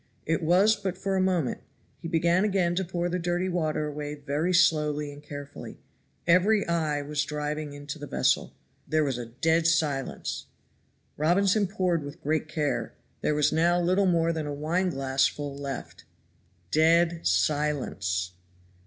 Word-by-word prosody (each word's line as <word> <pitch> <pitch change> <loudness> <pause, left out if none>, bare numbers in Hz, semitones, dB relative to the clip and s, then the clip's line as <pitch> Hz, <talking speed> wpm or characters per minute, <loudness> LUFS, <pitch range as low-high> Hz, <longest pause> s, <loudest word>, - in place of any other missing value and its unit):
It 165 0 0
was 185 +7 +4
but 195 -3 -4
for 195 0 -1
a 190 - +2
moment; 180 -8 0 0.4
he 170 - -6
began 170 +2 +2
again 190 -4 +1
to 190 +2 0
pour 175 -1 -2
the 180 +1 -2
dirty 175 +2 -1
water 155 -4 -1
away 150 0 -5
very 145 +4 -1
slowly 150 -4 +2
and 145 - -12
carefully. 145 -1 -9 0.5
Every 195 +5 +4
eye 155 -4 0
was 150 +1 -1
diving 150 0 -4
into 145 +1 -7
the 145 - -7
vessel. - - +1 0.3
There 155 0 +2
was 135 -4 -1
a 120 - -6
dead 160 +7 +1
silence! 155 -5 -1 0.7
Robinson 195 +6 +3
poured 180 -5 0
with 145 +4 -8
great 155 +1 0
care. 155 -2 -2 0.3
There 150 - +1
was 150 -1 +3
now 170 +2 +3
little 185 +3 +2
more 170 -1 +2
than 155 -2 -3
a 145 - -3
wine 170 +6 0
glassful 135 0 0
left. 140 -2 -7 0.7
DEAD 165 +2 +4
SILENCE! 115 - 0
160 Hz, 155 wpm, -27 LUFS, 145-175 Hz, 0.7 s, was